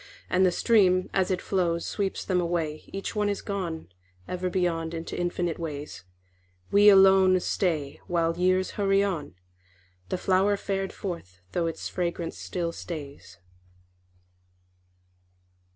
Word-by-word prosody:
And 185 +1 +4
the 185 - +4
stream 185 -2 +3
as 190 -1 +1
it 185 -1 -1
flows 170 -3 0
Sweeps 195 -2 -2
them 180 -2 +1
away, 165 -3 -2
Each 195 +3 -5
one 210 -1 +1
is 200 - -3
gone 180 -6 -4 0.4
Ever 180 0 -2
beyond 170 -3 -1
into 165 0 -5
infinite 175 -1 -2
ways. 150 - -6 0.7
We 205 +1 +7
alone 190 -1 +6
stay 160 -7 -1
While 165 -1 +1
years 185 +1 +2
hurry 195 0 +3
on, 175 - -3 0.7
The - - -1
flower 195 +2 +2
fared 195 -1 -2
forth, 95 - -7
though 170 -1 0
its 165 - -4
fragrance 170 -1 -3
still 170 -2 -3
stays. 145 - -8
180 Hz, 130 wpm, -27 LUFS, 165-190 Hz, 0.7 s, We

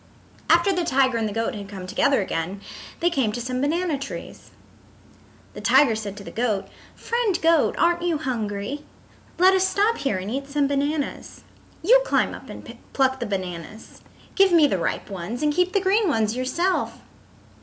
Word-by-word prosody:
After 340 +4 +4
the 360 -1 0
tiger 260 -5 +2
and 220 -1 -1
the - - -6
goat 225 +2 -2
had 200 -2 -8
come 190 -2 -7
together 265 +6 +2
again 180 +2 -3 0.4
they 345 +1 +2
came 265 -9 +1
to 245 - -4
some 250 +1 -3
banana 320 +1 0
trees. 275 - -8 1.0
The - - -8
tiger 270 -6 +5
said 205 -2 -6
to 200 - -9
the - - -9
goat: 220 -4 -1 0.3
"Friend 465 -5 -1
Goat, 330 -2 +3
aren't 345 0 +2
you 345 -2 0
hungry? 230 0 -3 0.5
Let 370 +2 +6
us 380 -1 +3
stop 420 +4 +1
here 245 -8 -1
and 190 +3 -5
eat 275 +2 -3
some 285 0 +1
bananas. 285 +1 -3 0.4
You - - +6
climb - - +1
up - - -11
and - - -10
pluck 265 -1 +2
the 240 - -3
bananas. 185 +1 -6 0.3
Give 390 -1 +4
me 330 -3 +6
the 195 -10 +1
ripe 170 - -3
ones, 195 - -5
and 300 0 +2
keep 360 +3 +1
the 400 - +2
green 395 +3 +2
ones 225 -7 +1
yourself." 340 +9 -1
275 Hz, 180 wpm, -23 LUFS, 215-345 Hz, 1.0 s, Let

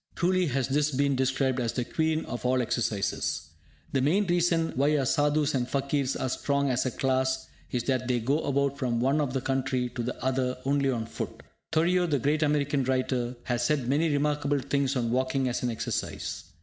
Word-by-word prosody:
Truly 185 0 +2
has 135 -2 0
this 145 +2 +2
been 140 0 +1
described 130 0 +1
as 115 -2 -1
the 125 - -1
Queen 160 +2 0
of 120 - -5
all 130 +1 +2
exercises. 110 -4 -1 0.4
The 135 - +1
main 180 +10 +3
reason 175 -2 +2
why 145 +3 +3
our 135 - +1
Sadhus 145 +2 +2
and 125 -2 0
Fakirs 140 0 0
are - - -2
strong 140 +1 0
as 130 +1 +1
a - - +2
class 130 +1 0 0.2
is 125 -2 -1
that 130 -1 0
they 125 -1 +1
go 135 +7 +1
about 140 -2 0
from 120 -2 0
one 135 +5 +2
end - - +2
of 135 -4 -1
the 135 - -1
country 130 -1 0
to 120 0 -5
the 125 +2 -4
other 130 -1 0
only 140 0 +2
on 115 -4 -1
foot. - - -6 0.3
Thoreau, 175 +3 +3
the 145 -3 +1
great 145 +5 +1
American 145 -2 +1
writer, 130 -1 0
has 120 -1 -1
said 135 -1 +1
many 150 +5 +2
remarkable 145 0 +1
things 140 0 0
on 120 -3 0
walking 130 +1 +1
as 120 - -1
an 125 - 0
exercise. 115 -7 -3
135 Hz, 200 wpm, -28 LUFS, 125-145 Hz, 0.4 s, main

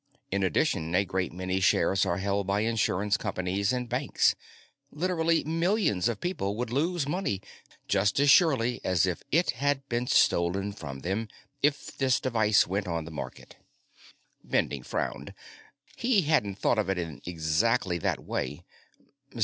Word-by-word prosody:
In 100 +1 0
addition, 80 -2 0
a 100 - +3
great 95 -1 -2
many 95 +2 -2
shares 95 +2 +2
are 85 -1 0
held 100 0 -1
by 100 +1 +1
insurance 105 -3 +1
companies 100 0 -1
and 125 -1 -2
banks. 125 +4 +1 0.6
Literally 165 0 +1
millions 165 - +1
of 110 -3 -3
people 105 - -2
would 120 +1 -3
lose 155 +3 0
money 170 - -1 0.5
just 100 +5 +2
as 145 - +3
surely 125 -9 +3
as 90 -2 +2
if 90 -2 -2
it 170 +3 +3
had 140 -1 -1
been 120 +1 -1
stolen 95 +2 +2
from 70 -8 -8
them 100 +7 -2 0.3
if 145 -1 0
this 130 -2 +2
device 110 -5 +3
went 95 +1 -2
on 85 -2 -2
the 80 - -9
market." 70 -4 -8 0.9
Bending 70 - 0
frowned. - - -4 0.6
He 235 -6 +2
hadn't 125 -11 +1
thought 110 - +1
of 105 - 0
it 95 - 0
in 85 -4 -5
exactly 90 +4 +1
that - - -1
way. 75 +4 -3
105 Hz, 150 wpm, -28 LUFS, 90-135 Hz, 0.9 s, a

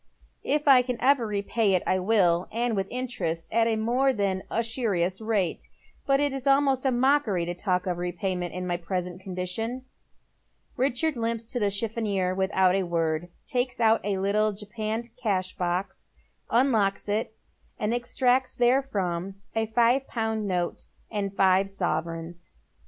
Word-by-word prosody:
" - - -43
If 300 - -10
I 270 -2 +8
ever 250 +1 +2
can - - -7
repay 205 0 +1
it 180 - 0
I 185 - +2
will, 180 -4 +3
and 235 0 0
with 195 -1 -1
interest 240 -10 -3
at 230 +1 +3
a 225 - +1
more 245 +5 +2
than 200 -5 -1
•usurious 220 -5 -1
rate. 210 -6 -1 0.4
But 275 0 +4
it 290 -1 +1
is 270 0 -4
almost 275 -1 +3
a - - +3
mockery 245 -8 +2
to 175 - -3
talk 180 0 -1
of 180 -2 -2
repayment 180 0 -2
in 180 0 -3
my 175 -1 -1
present 180 +1 -4
condition." 190 +7 -4 0.9
Richard 275 +4 +1
limps 230 -1 -2
to 245 +2 -3
the 205 -2 +2
chiffonier 200 -3 -1
without 190 -1 +2
a 195 - +2
word, 165 -1 -1 0.2
takes 245 0 -1
out 225 -1 +4
a 200 -1 -1
little 210 +2 +1
japanned 220 +3 -5
cash 195 -7 -1
box, 180 +2 -3 0.4
unlocks 225 -6 +2
it, 215 +2 -1 0.4
and 210 +2 -1
extracts 250 +1 +1
therefrom 200 -8 0 0.2
a 225 0 +1
five 240 +4 +2
pound 220 -2 -2
note 180 -2 -2 0.3
and 200 -2 -3
five 190 0 +4
sovereigns. 170 -2 -3
210 Hz, 155 wpm, -26 LUFS, 185-240 Hz, 0.9 s, I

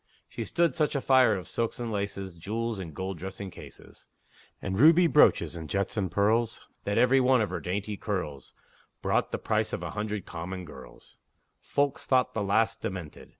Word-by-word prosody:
She - - -5
stood 170 -1 +1
such 150 -3 0
a - - +2
fire 130 -5 +5
of 95 - -6
silks 115 0 -2
and 120 -2 -3
laces, 100 -2 -3
Jewels 110 +6 -3
and 85 -4 -6
gold 95 -1 -4
dressing 95 +2 -6
cases, - - -13 0.5
And 95 0 -3
ruby 165 +5 +7
brooches, 90 - +4
and 80 -2 -7
jets 100 0 -1
and 100 -4 -1
pearls, 110 +4 +1 0.2
That 100 - 0
every 130 +2 +5
one 130 0 +4
of 105 -3 0
her 90 - -2
dainty 100 +4 -3
curls 80 - -4 0.5
Brought - - +1
the - - -1
price - - -1
of - - -3
a - - -4
hundred 105 -2 -3
common 90 +2 -6
girls; 65 -5 -13 0.4
Folks 140 -1 -1
thought 130 -1 +3
the 110 - -1
lass 100 +3 +2
demented! 90 -6 -7
100 Hz, 185 wpm, -28 LUFS, 95-120 Hz, 0.5 s, ruby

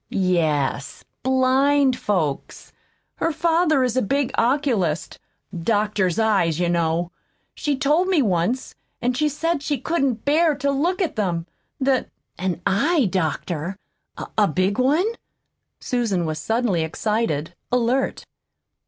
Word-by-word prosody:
"Yes 155 -7 0 0.2
blind 265 +1 +3
folks. 175 - -3 0.4
Her 330 - 0
father 325 -3 +2
is 250 -2 0
a 260 - +3
big 275 +4 0
oculist 230 - 0 0.4
doctors 205 0 0
eyes, 195 -8 +2
you 175 -1 +1
know. 170 0 0 0.4
She 290 -2 -1
told 300 +7 +2
me 375 -4 +3
once. 195 +5 0 0.3
And 245 +1 0
she 300 +3 +1
said 325 +1 -1
she 290 0 -1
couldn't 270 -6 -1
bear 310 +2 +3
to 280 0 0
look 345 +8 0
at 330 - -3
them; 175 -5 -1 0.3
that 265 -1 +1 0.2
" - - -51
"An 180 -2 -2
eye 250 - +2
doctor? 175 0 -2 0.6
a 210 -2 +4
big 185 +5 0
one?" 290 +9 +3 0.7
Susan 220 -8 -1
was 155 -1 -3
suddenly 220 -2 0
excited, 165 -2 -1 0.2
alert. 250 +2 0
230 Hz, 125 wpm, -22 LUFS, 175-280 Hz, 0.7 s, a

